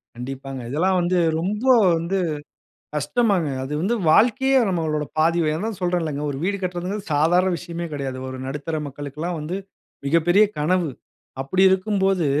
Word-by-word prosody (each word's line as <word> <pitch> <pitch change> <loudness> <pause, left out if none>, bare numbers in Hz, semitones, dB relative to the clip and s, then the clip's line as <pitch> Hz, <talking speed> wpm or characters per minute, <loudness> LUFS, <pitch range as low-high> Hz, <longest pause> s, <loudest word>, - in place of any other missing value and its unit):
கண்டிப்பாங்க. 135 +1 -6
இதெல்லாம் 180 +7 +1
வந்து 175 +1 +1 0.2
ரொம்ப 210 +8 -2 0.3
வந்து 170 +4 -1 0.8
கஷ்டம்தாங்க. 180 - +1 0.2
அது 135 - -6
வந்து 205 +8 +1 0.2
வாழ்க்கையே 265 - +4
நம்மளோட 160 -4 -1
பாதி 165 +2 +3 0.2
அதான் 215 +5 -3
சொல்றேன்ல்லங்க. 165 -5 -1
ஒரு 135 - -4
வீடு 200 +1 0
கட்டுறதுங்குறது 180 +2 -4
சாதாரண 175 +5 +3
விஷயமே 170 0 -5
கிடையாது. 135 -3 -4
ஒரு 130 0 -6
நடுத்தர 150 +4 -4
மக்களுக்கெல்லா 145 +4 -5
வந்து 160 +5 -4 0.5
மிகப்பெரிய 175 +7 +4
கனவு. 170 +1 +1 0.5
அப்படி 185 +8 +1
இருக்கும்போது, 190 -2 +1
170 Hz, 130 wpm, -22 LUFS, 150-190 Hz, 0.8 s, வாழ்க்கையே